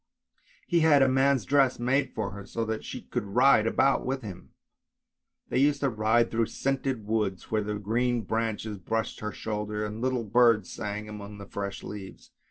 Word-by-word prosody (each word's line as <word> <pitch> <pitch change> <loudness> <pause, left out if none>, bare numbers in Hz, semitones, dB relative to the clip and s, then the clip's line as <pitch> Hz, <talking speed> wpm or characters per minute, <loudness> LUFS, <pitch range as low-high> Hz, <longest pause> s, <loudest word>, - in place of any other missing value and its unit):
He 175 -2 +2
had 150 -4 +5
a - - +4
man's 135 -2 +2
dress 135 -3 +3
made 130 +2 0
for 105 -3 -2
her, 100 0 -8
so 115 +3 -3
that 110 0 -3
she - - -7
could 120 - -3
ride 125 -3 +5
about 135 +4 +2
with 130 0 -3
him. 95 -4 -9 1.0
They - - +1
used 140 +1 +3
to 140 - +2
ride 110 +2 +2
through 115 -1 +1
scented 135 -4 -2
woods, 105 -4 -2
where 110 -1 +2
the 105 0 -3
green 120 +4 0
branches 110 -1 -2
brushed 110 +5 -2
her 105 0 -4
shoulders, 105 0 -3
and 105 +2 -7
little 130 -2 0
birds 115 -2 +3
sang 105 +1 -5
among 105 -1 -8
the 100 - -9
fresh 100 0 -5
leaves. 100 -2 -9
110 Hz, 180 wpm, -28 LUFS, 105-130 Hz, 1.0 s, had